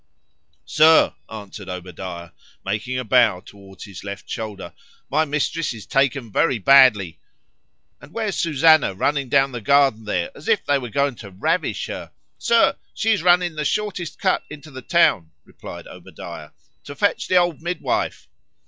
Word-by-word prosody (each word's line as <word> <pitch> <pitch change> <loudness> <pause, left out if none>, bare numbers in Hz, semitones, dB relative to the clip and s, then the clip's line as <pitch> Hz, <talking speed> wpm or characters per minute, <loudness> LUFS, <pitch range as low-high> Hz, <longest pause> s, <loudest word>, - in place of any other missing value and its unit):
Sir, 160 +1 +5 0.2
answered 105 -3 -9
Obadiah, 90 -1 -8 0.3
making 110 +6 -3
a 125 - -2
bow 110 -5 +3
towards 95 0 -14
his 100 -4 -10
left 100 0 -8
shoulder,—my 110 - -5
Mistress 150 -1 -2
is 105 - -11
taken 135 -4 0
very 130 +3 +1
badly.—And 95 - +1
where's 215 -1 -3
Susannah 155 - +3
running 140 +5 -1
down 135 0 +3
the 120 -2 -6
garden 135 -3 +3
there, 255 - -2
as - - -13
if 220 -3 +1
they 145 -1 +2
were 125 -2 -7
going 140 +4 0
to 100 - -10
ravish 95 +1 -2
her?——Sir, 230 -4 -1 0.2
she 225 - +1
is 215 - +1
running 175 0 +3
the 150 -1 -4
shortest 185 -1 -3
cut 190 -2 +1
into 150 0 -11
the 130 -1 -9
town, 110 - +2 0.2
replied - - -11
Obadiah, 75 - -11 0.4
to 145 - -9
fetch 200 +8 0
the 185 - 0
old 175 -4 +1
midwife. 175 0 -3
135 Hz, 150 wpm, -21 LUFS, 100-160 Hz, 0.4 s, Sir